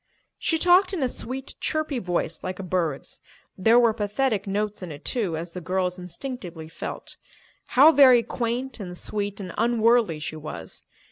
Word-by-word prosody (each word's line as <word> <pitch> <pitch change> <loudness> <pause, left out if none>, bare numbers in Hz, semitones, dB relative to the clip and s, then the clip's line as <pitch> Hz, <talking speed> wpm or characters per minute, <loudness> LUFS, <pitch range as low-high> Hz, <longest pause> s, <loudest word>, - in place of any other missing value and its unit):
She 325 - +1
talked 365 +3 +4
in 335 -7 -1
a - - +3
sweet, 260 +2 -5
chirpy 310 -4 -1
voice 175 -4 -2
like 185 0 -4
a 195 - -6
bird's. 170 -6 -2 0.4
There 225 +5 +4
were 235 -2 +5
pathetic 210 0 -1
notes 205 +1 -2
in 180 -3 -6
it, 145 +1 -10
too, 200 -10 -1
as 170 +1 -5
the 180 - -6
girls 180 +1 -1
instinctively 180 - -7
felt. 165 - -6 0.6
How 295 +5 +9
very 260 -5 +7
quaint 245 +3 -3
and 180 -3 -6
sweet 205 +1 -4
and 185 -3 -6
unworldly 230 -5 +3
she 155 +1 -5
was! 155 0 -7
210 Hz, 165 wpm, -25 LUFS, 180-250 Hz, 0.6 s, How